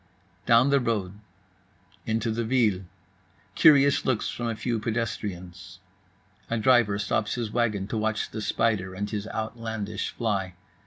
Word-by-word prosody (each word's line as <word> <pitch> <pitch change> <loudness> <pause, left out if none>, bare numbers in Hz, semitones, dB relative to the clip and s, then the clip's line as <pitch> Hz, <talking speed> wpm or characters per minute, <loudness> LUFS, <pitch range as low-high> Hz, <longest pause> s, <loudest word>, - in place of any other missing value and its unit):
Down 120 +3 +5
the 140 - +4
road. 105 -5 -2 0.9
Into 110 0 0
the 115 +1 -1
ville. 110 -6 +1 0.7
Curious 140 -1 +5
looks 125 -5 0
from 120 - -4
a 115 - -2
few 115 +1 -2
pedestrians. 95 -6 -4 0.7
A 115 - 0
driver 115 -3 +4
stops 105 +1 -1
his 115 -3 -3
wagon 110 -4 0
to 110 - -2
watch 110 0 -1
the 110 - -5
spider 105 -4 0
and 100 +2 -3
his 105 0 -4
outlandish 110 -2 -4
fly. 95 -5 -2
110 Hz, 140 wpm, -26 LUFS, 100-115 Hz, 0.9 s, Down